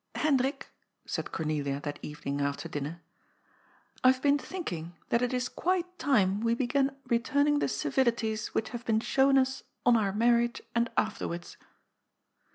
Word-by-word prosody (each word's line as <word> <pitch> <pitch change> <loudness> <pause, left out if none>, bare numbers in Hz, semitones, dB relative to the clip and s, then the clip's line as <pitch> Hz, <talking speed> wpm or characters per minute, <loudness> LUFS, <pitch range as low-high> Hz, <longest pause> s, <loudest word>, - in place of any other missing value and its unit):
" - - -42
Hbndbik," 275 -2 +1 0.4
said - - -4
Cornelia 145 -3 -1
that 145 -1 -5
evening 145 -1 -4
after 140 +3 -2
dinner, 155 +2 -5 0.5
" - - -31
I 255 - +8
have 260 - -3
been 285 +1 +3
thinking 175 - -5
that 235 - +2
it 250 - +1
is 250 0 0
qnite 360 +4 0
time 205 -8 +3
we 230 0 +2
began 270 +2 +1
re* 235 -2 +2
taming 285 +4 +2
the - - +1
civilities 230 -4 0
which 220 - -2
have 240 -1 -6
been 220 -1 +2
shown 270 +2 +4
ns 265 0 0 0.2
on 245 -1 +6
our 205 -4 +2
marrii^e 235 +3 +2
and 235 0 +1
afterwards. 175 -5 -2
235 Hz, 165 wpm, -29 LUFS, 180-265 Hz, 0.5 s, I